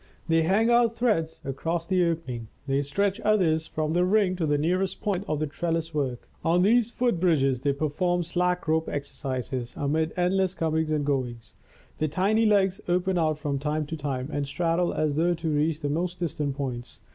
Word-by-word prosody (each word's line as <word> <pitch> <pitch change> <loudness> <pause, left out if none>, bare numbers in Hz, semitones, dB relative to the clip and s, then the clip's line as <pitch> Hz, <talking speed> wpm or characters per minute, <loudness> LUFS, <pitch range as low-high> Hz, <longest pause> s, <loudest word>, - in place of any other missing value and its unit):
They 165 -1 +3
hang 205 +8 +3
out 235 -1 +4
threads 210 -10 0
across 165 +5 -2
the 185 0 +2
openings 130 -9 -3 0.2
they 135 0 +1
stretch 195 +8 0
others 165 -7 +2
from 155 0 -2
the 175 +1 +3
ring 190 0 +3
to 165 -3 0
the 145 0 +2
nearest 185 +5 0
points 200 -2 -1
of 155 -1 0
the 155 - 0
trellis 165 +2 -2
work. 135 -5 -2 0.2
On 175 +2 +3
these 230 +3 +4
foot 240 -6 0
bridges 135 -8 +2
they 140 0 +2
perform 165 +5 0
slack 180 +1 0
rope 160 +1 +1
exercises 130 -3 -4
amid 155 +3 0
endless 185 +1 +1
comings 160 -2 0
and 150 -2 0
goings. 125 -5 -2 0.5
The 155 - +1
tiny 205 +8 +2
legs 195 -2 +2
open 180 +1 +1
out 155 -2 +1
from 145 -3 -2
time 150 +1 -1
to 160 - -5
time 135 -4 -3
and 145 -1 -2
straddle 170 +3 0
as 155 -2 0
though 170 +4 +2
to 165 -1 -3
reach 150 +1 0
the 145 - -1
most 175 +5 -1
distant 150 -5 -2
points. 125 -4 -5
160 Hz, 190 wpm, -26 LUFS, 145-180 Hz, 0.5 s, out